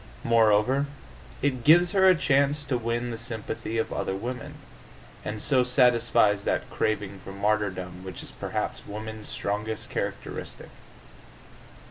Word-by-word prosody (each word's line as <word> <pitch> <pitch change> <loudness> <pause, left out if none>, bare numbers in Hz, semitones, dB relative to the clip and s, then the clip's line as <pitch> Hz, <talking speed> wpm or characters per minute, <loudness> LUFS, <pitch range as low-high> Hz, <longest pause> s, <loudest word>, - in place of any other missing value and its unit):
Moreover, 115 +4 +3 0.6
it 130 -4 0
gives 175 +5 +6
her 190 -2 +5
a 185 - +6
chance 140 -1 +2
to 135 -2 -1
win 120 +1 -2
the 115 - -5
sympathy 115 -1 -4
of 115 - -1
other 95 - -2
women, 120 +5 -5 0.7
and 105 0 -4
so 130 -3 +4
satisfies 120 -5 +3
that - - -1
craving 100 -2 -1
for - - -8
martyrdom 100 -3 -1
which 95 -2 -7
is - - -9
perhaps - - -4
woman's 110 +1 -6
strongest 105 +2 -3
characteristic. - - -5
115 Hz, 130 wpm, -27 LUFS, 105-130 Hz, 0.7 s, gives